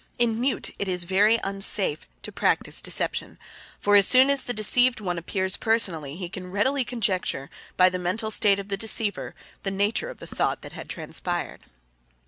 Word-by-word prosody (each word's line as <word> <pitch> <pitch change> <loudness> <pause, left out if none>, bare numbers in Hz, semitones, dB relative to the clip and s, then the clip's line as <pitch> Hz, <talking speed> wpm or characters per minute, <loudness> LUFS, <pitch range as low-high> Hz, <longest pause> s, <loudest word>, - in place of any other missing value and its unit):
In 235 -1 0
Mute 265 +2 -1
it 200 - -2
is 180 -1 0
very 205 +6 +2
unsafe 195 -5 +1 0.2
to - - -7
practice - - +2
deception, - - 0 0.4
for 205 0 +2
as 200 -2 +7
soon 260 +2 +6
as 280 -1 +1
the - - -2
deceived 245 +3 +2
one 180 -4 -4
appears 190 +2 -2
personally 170 -11 0
he 180 0 -6
can 180 0 -9
readily 260 +8 0
conjecture, 200 - -3 0.3
by 185 - +6
the 185 0 -2
mental 210 +5 -3
state 205 -2 +2
of 200 0 -8
the 195 - -3
deceiver, 220 0 +1 0.3
the 195 - -3
nature 205 - -1
of - - -10
the - - -11
thought - - -3
that - - -10
had - - -10
transpired. 175 -1 -5
200 Hz, 180 wpm, -24 LUFS, 185-225 Hz, 0.4 s, as